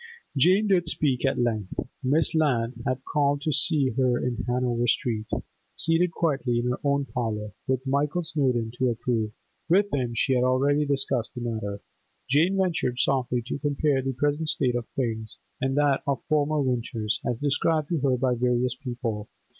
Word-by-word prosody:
Jane 185 +9 +4
did 175 -3 +3
speak 140 -6 0
at - - 0
length. 110 -5 -1 0.2
Miss 145 +5 +3
Lant 130 -7 +1
had 130 0 -2
called 145 -1 +1
to 155 -2 0
see 150 -3 +3
her 125 0 +2
in 125 -1 -2
Hanover 120 -1 0
Street; 110 -2 0 0.5
seated 165 +2 +3
quietly 140 -7 0
in 120 +1 0
her 125 - -3
own 140 -1 +1
parlour, 110 -5 -3 0.2
with 130 0 0
Michael 145 +6 0
Snowdon 130 -8 0
to 130 -1 +3
approve—with 120 - -1
him 125 -4 -1
she 130 +3 +2
had 125 -1 +2
already 140 +3 +2
discussed 135 -4 -1
the 120 - -5
matter—Jane 120 - -2
ventured 170 -10 0
softly 125 -3 +1
to 125 - -4
compare 145 -1 +1
the 135 0 -2
present 145 +4 0
state 125 -4 +1
of 120 -1 -3
things 110 -4 -3 0.2
and 135 +1 0
that 145 -2 +3
of 140 -1 -1
former 155 0 +1
winters, 120 -5 -1
as 120 - -1
described 145 +3 0
to 170 -3 0
her 130 -2 +2
by 125 0 +1
various 125 0 +1
people. 120 -5 -5
130 Hz, 165 wpm, -26 LUFS, 120-145 Hz, 0.5 s, Jane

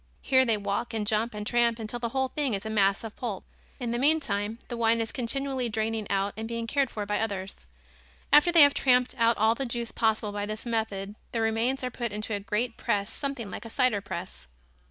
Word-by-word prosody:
Here 260 -1 +4
they 225 -3 +2
walk 205 +3 -2
and 215 -2 -1
jump 220 +1 0
and 210 0 -5
tramp 235 0 +2
until 225 +1 -5
the 235 -1 -2
whole 265 +2 0
thing 275 -7 -1
is 200 +2 -6
a 220 - -3
mass 200 -1 +2
of 225 -2 -7
pulp. 215 -7 -4 0.4
In 240 -3 -2
the 240 - -1
meantime, 225 -8 +1
the 240 - -5
wine 230 0 +2
is 225 -1 -2
continually 265 0 -1
draining 220 -1 -2
out 200 0 0
and 220 +1 -5
being 230 0 -3
cared 275 +2 +1
for 210 -3 -4
by 205 0 -1
others. 195 - -4 0.7
After 295 +4 +7
they 335 -3 +9
have 285 0 +6
tramped 250 -2 +3
out 230 0 +4
all 220 +1 +4
the 270 - -3
juice 235 -1 -3
possible 220 -2 0
by 205 0 -3
this 215 +2 -5
method 220 -4 -2 0.2
the 230 - 0
remains 225 +4 0
are 250 - -2
put 235 -2 -3
into 215 +1 -4
a 205 - -1
great 225 +3 -2
press 200 0 -1
something 275 -8 -4
like - - -6
a 230 - -8
cider 250 -4 +2
press. 185 - -7
225 Hz, 225 wpm, -28 LUFS, 210-245 Hz, 0.7 s, they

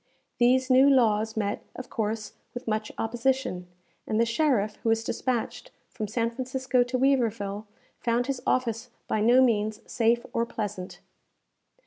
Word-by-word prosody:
These 255 +2 +3
new 265 +2 +7
laws 220 -4 +3
met, 205 -1 -1
of 255 - -8
course, 215 0 -3 0.2
with 245 - -7
much 215 0 -1
opposition, 235 -5 -1 0.4
and 215 - 0
the 230 - +4
sheriff 230 -4 +1
who 230 - -2
was 225 0 +2
despatched 250 - -2 0.2
from 215 -3 -4
San 230 +2 -1
Francisco 255 +1 0
to 245 +1 0
Weaverville, 225 -6 0 0.3
found 240 +1 +1
his 270 -1 -3
office 240 -1 0 0.2
by 215 - 0
no 245 +4 +6
means 215 -3 +1
safe 235 0 +1
or 230 - +1
pleasant. 205 -5 -5
230 Hz, 145 wpm, -27 LUFS, 215-255 Hz, 0.4 s, new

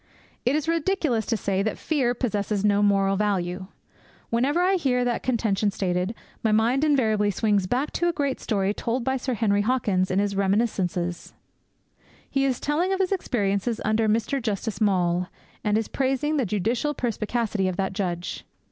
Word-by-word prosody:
It 260 - +3
is 305 0 -1
ridiculous 325 - 0
to 230 - +1
say 195 -1 0
that 215 +2 -1
fear 260 -6 0
possesses 210 -4 -1
no 205 0 +3
moral 195 -1 +3
value. 185 -3 -1 0.6
Whenever 265 +8 +2
I 375 +2 +3
hear 255 -9 +1
that 240 -1 0
contention 215 -5 +1
stated, 185 +1 -1 0.3
my 220 - +1
mind 235 +6 +3
invariably 220 -9 +2
swings 205 -1 +1
back 255 +8 -1
to 345 - 0
a - - +3
great 280 -5 -2
story 200 -2 0
told 235 +3 -2
by 265 +2 0
Sir 255 0 -2
Henry 205 -2 +2
Hawkins 205 -5 +1
in 185 - 0
his 200 0 +1
Reminiscences. 190 -4 -1 0.9
He 275 0 0
is 260 -2 0
telling 330 +6 0
of 385 - 0
his 380 0 +1
experiences 220 - 0
under 215 +1 +2
Mr. 230 +5 0
Justice 215 -2 -3
Maule, 180 -3 +2 0.4
and 210 0 +2
is 225 - -1
praising 270 +3 0
the 260 -6 +1
judicial 230 +9 0
perspicacity 220 -3 -1
of 185 -1 -2
that 190 -1 -1
judge. 180 -3 -3
220 Hz, 170 wpm, -25 LUFS, 200-260 Hz, 0.9 s, It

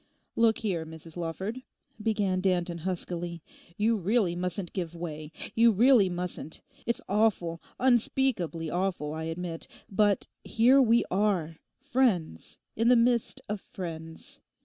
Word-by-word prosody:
'Look 230 -1 +4
here, 185 -7 -1
Mrs 160 0 -11
Lawford,' 190 +8 -4 0.4
began 205 -4 +1
Danton 175 -2 0
huskily, 175 -1 -4 0.3
'you 225 +2 +2
really 200 -2 +1
mustn't 180 +1 -3
give 175 -3 -4
way; 155 -2 -6 0.2
you 230 +1 +5
really 225 -1 +5
mustn't. 175 -2 -5 0.2
It's 235 - 0
awful, 195 -5 +1 0.2
unspeakably 240 - +1
awful, 175 -5 -1
I 160 0 -4
admit. 165 0 -4 0.2
But 205 0 +2 0.2
here 250 +5 +5
we 235 -1 +4
are; 185 -6 +1 0.2
friends, 245 - 0 0.2
in 225 +1 +1
the 250 - +7
midst 235 0 +2
of 210 -1 -3
friends. 165 -3 -8
185 Hz, 125 wpm, -28 LUFS, 170-225 Hz, 0.4 s, the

